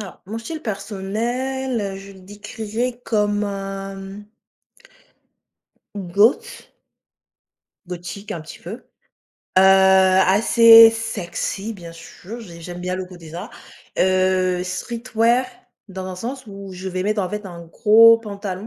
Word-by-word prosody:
Alors, 195 -4 -9
mon 215 +4 -6
style 310 +7 -7
personnel, 220 +2 -3
je 195 +1 -11
le 190 - -16
décrirais 220 +5 -5
comme, 210 -1 0
un, 195 -1 -5
mmh 195 +1 -9 1.9
goth 270 - +1 1.2
gothique 180 +3 -8
un 170 - -5
petit 155 - -11
peu, 175 - -9
heu, 245 - -13 0.7
assez 190 +4 +7
sexy, 225 -1 -4
bien 170 -5 -10
sûr, 190 +7 -11
j'ai 170 -6 -11
j'aime 175 +1 -8
bien 180 +1 -3
le 185 - -4
coté, 175 -3 -13
ça, 180 +8 -7 0.5
heu 185 -1 +2
streetwear, 235 +6 0 0.4
dans 190 0 -7
un 185 - -6
sens 255 +7 -6
où 195 -1 -9
je 185 +1 -6
vais 185 0 -3
mettre, 210 +1 0
en 185 - -3
fait, 210 0 -5
un 175 -2 -9
gros 230 +6 +6
pantalon 200 -2 -6
200 Hz, 130 wpm, -21 LUFS, 185-225 Hz, 1.9 s, assez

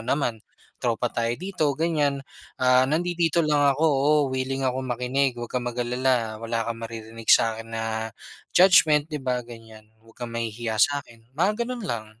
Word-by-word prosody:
naman 120 -5 -1 0.4
tropa 120 0 0
tayo 115 0 0
dito" 180 -6 0
ganiyan. 150 -4 0 0.4
"Ah, 125 0 +5
nandidito 170 +2 +1
lang 145 -2 +3
ako, 155 +4 0
oo, 145 0 +3 0.2
willing 130 +1 -2
akong 130 0 -1
makinig, 125 +2 0
'wag 120 -1 -6
kang 125 -1 -2
mag-alala 120 -2 -1
wala 115 0 -2
kang 115 0 -4
maririnig 115 0 -8
sa'kin 115 0 +3
na 110 0 -3 0.4
judgement" 160 -5 +5
di 155 - -4
ba, 125 -1 0
ganiyan. 115 -2 -13 0.2
"Wag 115 - -21
kang 120 -1 -5
mahihiya 115 -1 -3
sa'kin," 130 -6 0
mga 200 - +1
gano'n 245 -2 -5
lang. 110 -2 -3
125 Hz, 155 wpm, -25 LUFS, 115-145 Hz, 0.4 s, Ah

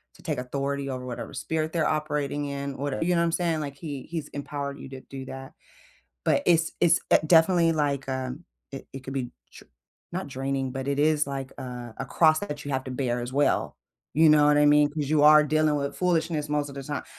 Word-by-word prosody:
to - - -18
take 155 -6 -2
authority 140 +2 -3
over 130 -1 -5
whatever 125 -2 -6
spirit 160 0 -2
they're 165 -2 +1
operating 150 -2 -1
in 140 -1 -4
whatever 140 +2 -2
you 180 +2 +1
know - - +2
what - - +3
I'm 165 - 0
saying? 170 -2 0
Like, 140 -1 -5
He 140 -3 -6
He's 165 -3 -5
empowered 140 0 -5
you - - -8
to 135 -1 -9
do 135 0 -9
that, 135 0 -8 0.7
but - - +2
it's 165 -1 +3
it's, 170 -1 +4
eh, - - +6
definitely 165 +1 +5
like, 145 -3 -1
um 130 +4 -4 0.3
it 135 - -8
it 135 - -7
could 135 - -6
be 130 -3 -3 0.3
dr - - -26 0.4
not 185 +2 -3
draining, 135 0 -2
but 135 0 -4
it 140 0 0
is 150 0 +3
like, 135 -1 -5
uh, 125 -2 -7
a - - -3
cross 155 -1 +4
that 150 -7 -5
you 145 - -3
have 130 +1 -1
to 130 - -6
bear 125 -2 -1
as 120 +1 -5
well, 145 +1 +1 0.4
you 160 +1 +6
know 150 -1 +6
what 150 0 +4
I 150 - +5
mean? 145 0 +5
'Cause 145 -2 -3
you 150 -2 +3
are 150 0 +8
dealing 155 0 +2
with 140 0 -3
foolishness 165 -4 0
most 150 -1 0
of - - -10
the 140 - -5
time 145 0 -4
145 Hz, 230 wpm, -26 LUFS, 135-155 Hz, 0.7 s, are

